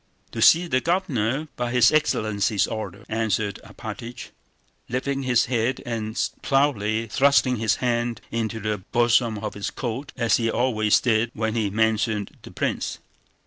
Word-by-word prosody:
"To - - -4
see 170 +2 +6
the 130 -6 +1
Governor 150 - 0
by 120 -1 -2
his 125 -1 +5
excellency's 110 -8 +1
order," 110 -1 -6
answered 110 -2 -1
Alpátych, 115 +2 -8 0.6
lifting 135 +2 -2
his 125 -3 +2
head 120 +1 0
and 110 -1 -3 0.2
proudly 115 -6 +1
thrusting 130 +1 +3
his 110 0 +1
hand 120 -2 -1
into 110 -1 -2
the 105 -1 -2
bosom 120 +2 +2
of 105 0 -5
his 100 - -4
coat 130 +5 -5
as 120 -2 +3
he 115 -1 0
always 110 -3 +2
did 115 -1 +2
when 110 0 -1
he 110 -3 0
mentioned 110 -1 0
the - - -11
prince.... - - -2
115 Hz, 145 wpm, -24 LUFS, 110-125 Hz, 0.6 s, see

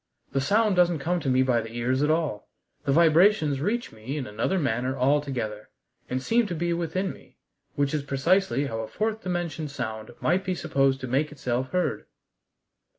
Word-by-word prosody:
The 135 - 0
sound 210 +7 +3
doesn't 175 -2 +4
come 175 +5 -1
to 145 -4 -2
me 130 0 +4
by 125 -3 +2
the 115 +1 -9
ears 125 +3 0
at 150 - +2
all. 155 -9 -1 0.4
The - - +2
vibrations 160 -2 +4
reach 230 +8 -1
me 115 +7 -6
in 135 - -3
another 110 - -1
manner 130 -3 -1
altogether, 130 -6 0 0.4
and 130 +1 -2
seem 230 - +2
to 175 - -3
be 170 +1 0
within 175 +3 -2
me, - - -19 0.4
which 140 0 0
is 150 - 0
precisely 140 0 +1
how 115 -5 -4
a 110 - -4
fourth 220 - -2
dimension 175 -5 -3
sound 110 -6 -5
might 180 +3 +1
be 185 -1 -1
supposed 135 -4 +1
to 130 - -4
make 140 +5 0
itself 130 -2 -2
heard." 180 +3 -1
145 Hz, 185 wpm, -26 LUFS, 130-175 Hz, 0.4 s, doesn't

